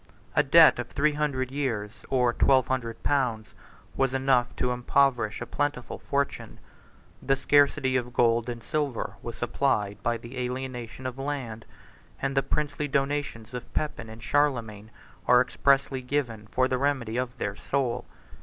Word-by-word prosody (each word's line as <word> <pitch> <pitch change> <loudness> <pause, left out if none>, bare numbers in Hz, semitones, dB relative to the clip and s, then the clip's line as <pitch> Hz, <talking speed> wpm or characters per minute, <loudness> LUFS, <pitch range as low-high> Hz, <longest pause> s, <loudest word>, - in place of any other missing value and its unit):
A - - +6
debt - - +7
of - - -3
three 150 +1 +1
hundred 140 -4 -1
years, 120 -8 -2 0.2
or 125 -2 +2
twelve 130 -1 +3
hundred 120 -3 -3
pounds, 125 -6 0 0.5
was 135 -1 +1
enough 130 -2 +2
to 125 - 0
impoverish 125 -3 +1
a - - -3
plentiful 145 -2 -3
fortune; 140 0 -2 0.6
the 135 - +2
scarcity 140 -1 +3
of 125 -1 -3
gold 115 0 +2
and 120 -1 -6
silver 150 -6 -2
was 120 - -7
supplied 105 -5 0
by 120 +2 0
the 120 +3 -8
alienation 125 -1 -5
of 130 +1 -4
land; 135 -6 -4 0.5
and 135 0 -2
the 135 - +4
princely 145 +2 -2
donations 135 -5 -2
of 125 - -7
Pepin 135 -7 -2
and 110 +1 -11
Charlemagne 115 -8 0 0.4
are - - +7
expressly 135 -1 +2
given 125 -5 -2
for 130 +4 +1
the 130 -1 -1
remedy 130 -5 0
of 125 0 -3
their 100 -4 -3
soul. 130 +1 -2
130 Hz, 155 wpm, -27 LUFS, 120-140 Hz, 0.6 s, debt